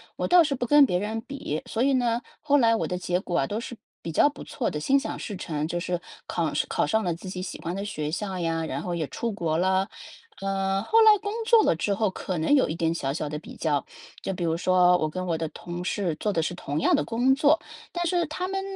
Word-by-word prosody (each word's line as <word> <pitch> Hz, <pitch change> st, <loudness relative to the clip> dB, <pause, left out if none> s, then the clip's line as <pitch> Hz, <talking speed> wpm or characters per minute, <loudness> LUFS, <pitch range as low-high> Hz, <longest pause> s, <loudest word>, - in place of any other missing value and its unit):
我 -, -, -2 dB
倒 355 Hz, -1 st, +7 dB
是 295 Hz, -3 st, 0 dB
不 250 Hz, -, -3 dB
跟 295 Hz, +2 st, +7 dB
别 180 Hz, -8 st, 0 dB
人 215 Hz, +3 st, -2 dB
比， 230 Hz, -, -4 dB
所 225 Hz, -, -3 dB
以 275 Hz, +2 st, +3 dB
呢， 240 Hz, -2 st, +1 dB, 0.2 s
后 290 Hz, -1 st, +3 dB
来 230 Hz, -2 st, +4 dB
我 -, -, -1 dB
的 180 Hz, -, -2 dB
结 180 Hz, 0 st, -1 dB
果 175 Hz, -2 st, -1 dB
啊 135 Hz, -, +1 dB
都 210 Hz, -, -3 dB
是 240 Hz, +1 st, -7 dB, 0.3 s
比 165 Hz, -, -4 dB
较 225 Hz, -, +4 dB
不 290 Hz, -, -10 dB
错 245 Hz, -, -2 dB
的， 150 Hz, -, -4 dB
心 270 Hz, -, +3 dB
想 -, -, -5 dB
事 205 Hz, -, -5 dB
成， 155 Hz, -4 st, -3 dB
就 175 Hz, +1 st, -2 dB
是 175 Hz, 0 st, -2 dB, 0.3 s
考 -, -, -1 dB
上 -, -, 0 dB
考 -, -, +1 dB
上 220 Hz, 0 st, +1 dB
了 175 Hz, -4 st, -1 dB
自 180 Hz, -, -10 dB
己 185 Hz, 0 st, -5 dB
喜 185 Hz, -, -6 dB
欢 170 Hz, +2 st, -3 dB
的 195 Hz, -, -3 dB
学 155 Hz, -7 st, -3 dB
校 190 Hz, +2 st, -3 dB
呀， 165 Hz, -2 st, -1 dB
然 140 Hz, +2 st, -4 dB
后 175 Hz, -, -3 dB
也 165 Hz, -3 st, -2 dB
出 230 Hz, -, -3 dB
国 165 Hz, -6 st, -1 dB
了。 190 Hz, +2 st, +2 dB, 0.5 s
嗯， 195 Hz, 0 st, -1 dB
后 450 Hz, -, +4 dB
来 435 Hz, -1 st, +8 dB
工 410 Hz, +1 st, -4 dB
作 460 Hz, -2 st, +6 dB
了 -, -, +3 dB
之 200 Hz, +5 st, 0 dB
后 210 Hz, -1 st, +1 dB
可 185 Hz, -1 st, -4 dB
能 160 Hz, -, +2 dB
有 280 Hz, -, +4 dB
一 155 Hz, -, -2 dB
点 165 Hz, -1 st, 0 dB
小 135 Hz, -5 st, -2 dB
小 150 Hz, +1 st, -3 dB
的 150 Hz, +1 st, -4 dB
比 -, -, -12 dB
较。 145 Hz, -3 st, 0 dB, 0.4 s
就 -, -, -3 dB
比 175 Hz, -, -4 dB
如 165 Hz, -1 st, +1 dB
说， 180 Hz, +1 st, +4 dB
我 155 Hz, -, 0 dB
跟 185 Hz, +4 st, -4 dB
我 170 Hz, -2 st, 0 dB
的 160 Hz, -1 st, -3 dB
同 175 Hz, +3 st, -7 dB
事 180 Hz, -2 st, -1 dB
做 210 Hz, -, 0 dB
的 165 Hz, -4 st, 0 dB
是 180 Hz, -, -2 dB
同 150 Hz, -4 st, -3 dB
样 -, -, +4 dB
的 -, -, +1 dB
工 245 Hz, -, +2 dB
作， 295 Hz, +3 st, +4 dB, 0.3 s
但 345 Hz, 0 st, -2 dB
是 345 Hz, 0 st, +1 dB
他 360 Hz, +4 st, -3 dB
们 385 Hz, 0 st, -2 dB
185 Hz, 290 characters per minute, -26 LUFS, 165-245 Hz, 0.5 s, 来